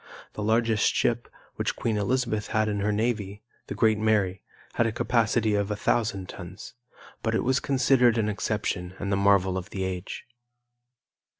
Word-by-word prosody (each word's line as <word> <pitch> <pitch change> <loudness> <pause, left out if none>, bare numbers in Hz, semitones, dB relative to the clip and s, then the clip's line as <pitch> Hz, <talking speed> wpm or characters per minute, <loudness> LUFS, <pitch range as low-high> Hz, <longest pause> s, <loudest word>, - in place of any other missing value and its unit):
The - - -6
largest 110 0 +2
ship 120 -1 +1 0.3
which - - -1
Queen 115 -2 -1
Elizabeth 110 0 0
had 110 0 +1
in 105 -1 -1
her 105 +1 +1
navy, 105 -2 -2 0.2
the - - -5
Great 110 -2 +3
Mary, 105 -4 +1 0.3
had 115 - +2
a - - -1
capacity 115 -1 +1
of 100 0 0
a 105 - -1
thousand 105 -3 0
tons; 90 +4 -9 0.5
but 110 -1 0
it - - +1
was 130 +2 +2
considered 125 -3 +3
an 110 -2 +1
exception 100 -3 -2
and 100 0 -3
the - - +3
marvel 100 -1 +3
of 90 - -10
the 95 - -4
age. 95 0 -5
105 Hz, 170 wpm, -26 LUFS, 100-115 Hz, 0.5 s, Great